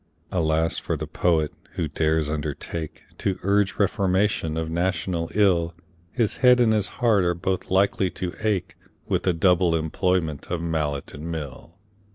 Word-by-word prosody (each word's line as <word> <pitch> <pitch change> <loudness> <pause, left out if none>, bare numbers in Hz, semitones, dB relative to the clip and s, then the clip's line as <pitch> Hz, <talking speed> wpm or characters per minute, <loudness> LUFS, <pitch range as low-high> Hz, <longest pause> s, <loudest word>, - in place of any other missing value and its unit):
Alas 80 -2 +1
for - - -2
the - - -4
Poet, 80 -4 +1 0.2
who 80 - -2
dares 80 0 +1
undertake 75 +1 -4 0.2
To 95 -2 -1
urge 100 0 +2
reformation 95 -4 +1
of 80 0 -2
national 85 0 -1
ill! 85 -5 +3 0.4
His 115 -5 0
head 125 -1 +6
and 115 -2 +4
his 105 -2 +1
heart 110 -6 +3
are 85 0 +1
both 95 +2 -2
likely 95 0 +2
to 90 -1 -3
ache 95 -4 -1 0.3
With - - +1
the 90 - +1
double 90 0 +3
employment 80 -1 -1
of 85 -1 -1
mallet 75 -4 -2
and 80 +3 -6
mill. 80 +1 -7
85 Hz, 155 wpm, -24 LUFS, 80-95 Hz, 0.4 s, head